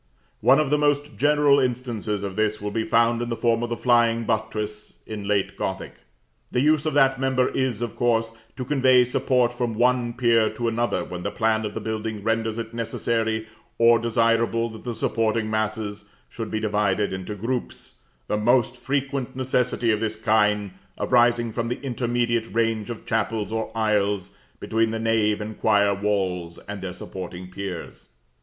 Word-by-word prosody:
One 135 +2 +5
of 150 -2 +1
the 150 - +3
most 145 -2 +1
general 145 +3 +4
instances 120 -5 -2
of 100 -2 -4
this 110 0 0
will 105 0 -4
be 110 +1 -1
found 115 0 +3
in 120 - -3
the 115 - -1
form 115 0 +1
of 120 - -2
the 120 - -2
flying 115 -1 +3
buttress 110 -1 -3
in 105 -2 -6
late 100 -2 0
Gothic. - - -5 0.5
The - - +1
use 155 +1 +3
of 155 - -1
that 135 -2 +4
member 130 -1 +2
is, 125 -4 -1
of 120 - -4
course, 115 -2 +1 0.2
to 130 -1 -5
convey 130 -2 +4
support 125 0 +1
from 120 -2 -2
one 120 0 +2
pier 115 -2 +3
to 120 +2 -2
another 115 +1 0
when 90 -1 -6
the - - -2
plan 110 0 0
of 105 - -9
the - - -2
building 110 -1 -4
renders 115 0 0
it 115 0 -5
necessary 115 -1 -1 0.3
or 115 0 +5
desirable 115 0 +1
that 110 +2 -11
the 120 -2 -3
supporting 110 -1 0
masses 110 -1 -2 0.2
should 115 -2 -6
be 110 - -2
divided 105 -2 0
into 95 +3 -5
groups, 120 +5 -5 0.3
the 105 - 0
most 120 +2 +2
frequent 135 -1 -2
necessity 125 -2 +1
of 105 - +1
this 110 0 -2
kind 105 -2 +2 0.3
arising 120 -1 +3
from 115 +1 -2
the 120 - -3
intermediate 120 -3 -1
range 115 0 0
of 115 - -7
chapels 110 -2 -1
or 110 0 -2
aisles 105 -3 +1 0.3
between 115 0 +1
the 110 - -2
nave 110 -2 +1
or 105 +1 -5
choir 100 -1 +3
walls 95 -4 -1
and 105 -1 -6
their 95 -1 -4
supporting 90 0 -8
piers. 95 -2 -7
115 Hz, 175 wpm, -24 LUFS, 105-120 Hz, 0.5 s, One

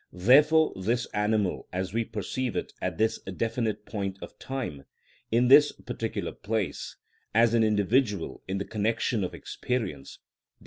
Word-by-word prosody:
Therefore 150 - +5
this 115 +6 0
animal 105 -2 0
as 95 +1 -3
we 115 +1 +1
perceive 110 +4 -3
it - - -3
at 90 -3 -2
this 110 0 +1
definite 110 +2 -2
point 100 -3 -4
of - - -11
time, 120 - -5 0.4
in 120 +2 +3
this 145 +3 +8
particular - - -4
place, 105 -2 -3 0.4
as 115 0 +5
an 115 -1 +4
individual 105 -2 +1
in 95 - -2
the 100 - -3
connection 110 0 0
of 90 - -4
experience 100 - -4
(_i. - - -65
110 Hz, 145 wpm, -28 LUFS, 95-120 Hz, 0.4 s, this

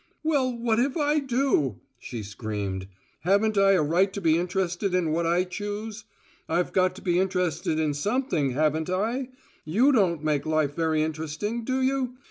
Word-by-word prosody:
"Well, 270 -6 +1
what 230 -1 +1
if 270 +5 +1
I 300 0 +2
do?" 255 - 0 0.2
she 115 -3 -6
screamed. 100 -2 -4 0.3
"Haven't 200 +4 +2
I 195 0 +5
a 180 -5 +3
right 175 +6 +2
to - - -3
be 160 -4 +3
interested 180 +2 -1
in 170 -4 +1
what 165 +1 0
I 175 +2 +3
choose? 205 +3 -6 0.4
I've 180 - 0
got 185 -1 +2
to - - -12
be 175 -2 +2
interested 180 -4 0
in 155 -2 +1
something, 170 - 0
haven't 155 +3 +1
I? 230 +8 -1 0.3
You 225 - +3
don't 180 - +2
make 150 -1 0
life 155 -2 +1
very 160 -1 +1
interesting, 160 +9 -3
do 260 +2 0
you? 260 -1 0
180 Hz, 170 wpm, -26 LUFS, 155-225 Hz, 0.4 s, I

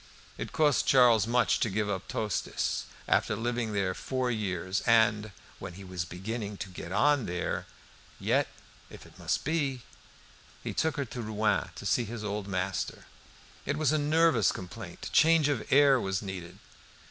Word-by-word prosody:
It - - -6
cost 150 -4 +2
Charles 120 -5 +5
much 120 +1 +2
to 115 - +1
give 105 +1 -1
up 95 -2 -3
Tostes 105 -1 -2 0.2
after - - +2
living 120 0 -2
there 95 -2 0
four 130 +4 -2
years 95 -3 -2
and 110 -2 +4 0.3
"when 90 - -7
he 100 - -10
was 90 -2 -4
beginning 100 +4 -5
to 95 - -6
get 90 -1 -8
on 145 +4 +3
there." 90 0 -3 0.5
Yet - - +2 0.4
if - - -12
it - - -17
must - - -1
be! 140 -5 -1 0.8
He - - -4
took 160 -2 0
her 140 - -1
to 120 +1 -6
Rouen 110 -1 0
to - - -9
see 120 - +2
his 110 0 -6
old 105 -1 -3
master. 95 0 -3 0.6
It 140 +1 -2
was 155 -3 +2
a 155 - +2
nervous 155 - +3
complaint: 90 - -8
change 165 -2 +5
of 140 -6 -2
air 140 -1 +6
was 95 -3 -2
needed. 95 -3 -7
110 Hz, 165 wpm, -29 LUFS, 95-135 Hz, 0.8 s, air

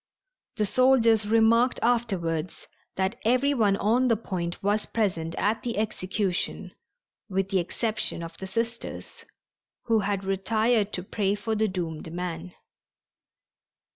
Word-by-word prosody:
The 215 -3 +1
soldiers 230 -1 +4
remarked 230 +3 +4
afterwards 185 -9 0 0.3
that 190 +6 -1
every 255 +5 +3
one 210 -6 +2
on 235 +6 +2
the 230 -3 +3
Point 180 -5 -4
was 205 +2 +1
present 170 -7 -1
at 215 +2 0
the 235 -3 -3
execution 200 -3 -2 0.6
with 195 0 -1
the 195 -2 +2
exception 210 0 -2
of 165 0 -8
the 190 - -6
Sisters, 230 +4 -4 0.6
who 225 -2 +2
had 200 -1 -1
retired 210 +3 +1
to 180 - -3
pray 200 0 0
for 215 +2 -3
the 220 0 +2
doomed 165 -4 -4
man. 175 0 -5
205 Hz, 130 wpm, -26 LUFS, 185-230 Hz, 0.6 s, soldiers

